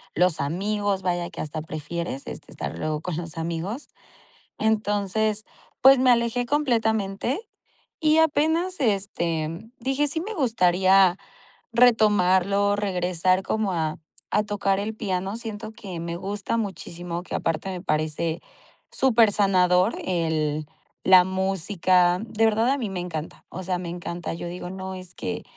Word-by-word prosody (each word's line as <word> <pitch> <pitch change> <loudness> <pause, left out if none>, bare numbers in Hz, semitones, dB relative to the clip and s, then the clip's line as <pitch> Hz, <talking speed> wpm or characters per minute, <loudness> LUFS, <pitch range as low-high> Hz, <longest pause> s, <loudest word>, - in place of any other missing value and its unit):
los 180 -3 +2
amigos. 195 +5 -1
Vaya 175 -1 -1
que - - -11
hasta 155 +1 -4
prefieres 155 -1 -5
este - - -9
estar - - -5
luego 155 -1 -2
con 180 0 -4
los 165 -2 -6
amigos. 170 - -4 0.7
Entonces, 215 0 0 0.4
pues 270 0 +8
me 255 0 +4
alejé 235 0 +2
completamente 230 - 0 0.6
y 310 -1 +4
apenas 320 +4 +2
este 175 - -1
dije: 270 +4 0
"Sí, 320 +3 -1
me 440 +4 -5
gustaría, 190 - +4 0.5
retomarlo", 205 -4 +4
regresar 185 -2 +1
como 210 +1 -1
a 160 -2 -1 0.3
a 210 - +2
tocar 200 -2 0
el 210 +2 -3
piano. 195 -1 -2
Siento 220 -2 -6
que 190 -6 -7
me 170 0 -4
gusta 200 +4 -3
muchísimo, 175 -4 -4
que - - -9
aparte 165 +3 -1
me 185 -2 -5
parece 160 0 -1 0.5
súper 230 -5 +4
sanador 185 0 +3
el 155 -4 -1 0.4
la 185 -1 +8
música, 185 -1 +2
de 225 -1 -1
verdad 225 +2 +3
a 275 - +2
mí 235 -6 -3
me 190 -2 -4
encanta. 165 -3 -6
O 185 - -7
sea, 180 0 -1
me 175 -1 -5
encanta. 175 -1 -5
Yo 170 +1 -6
digo: 175 +1 -6
"No, 190 0 -6
es 185 -1 -10
que - - -4
190 Hz, 145 wpm, -25 LUFS, 175-220 Hz, 0.7 s, pues